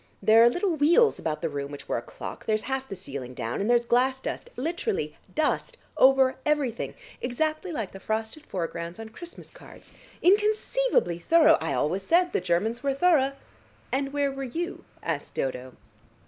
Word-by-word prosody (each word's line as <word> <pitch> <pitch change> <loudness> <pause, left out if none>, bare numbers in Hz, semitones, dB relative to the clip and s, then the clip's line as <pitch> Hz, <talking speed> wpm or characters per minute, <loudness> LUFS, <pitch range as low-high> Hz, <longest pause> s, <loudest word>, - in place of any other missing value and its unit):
There 220 +3 +6
are 235 - +8
little 355 +6 0
wheels 340 +10 +4
about 155 +1 -3
the - - +2
room 140 -1 -4
which 145 - -9
were - - 0
a - - -9
clock, - - -9
there's 215 -1 +1
half 265 0 -3
the 195 - -5
ceiling 130 -6 -7
down, 115 +7 -3
and 205 - -1
there's 240 0 +4
glass 255 +2 +2
dust, 480 - -5
literally 350 - -2 0.2
dust - - 0 0.2
over 265 0 +5
everything, 290 -6 -1 0.3
exactly 310 +8 -1
like 225 - -3
the 195 - -10
frosted 220 +8 -3
foregrounds 170 - -5
on 225 0 -7
Christmas 345 +10 -10
cards. - - -15 0.3
Inconceivably 420 - +2
thorough! 325 - +5
I 160 - -1
always 175 +6 0
said 350 - +2
the - - +1
Germans 190 +7 0
were 275 0 0
thorough." 275 -4 +3 0.6
"And 275 +1 -1
where 285 -1 0
were 270 0 -6
you?" 335 +8 -4 0.2
asked - - -3
Dodo. 130 -1 -3
260 Hz, 175 wpm, -27 LUFS, 190-315 Hz, 0.6 s, are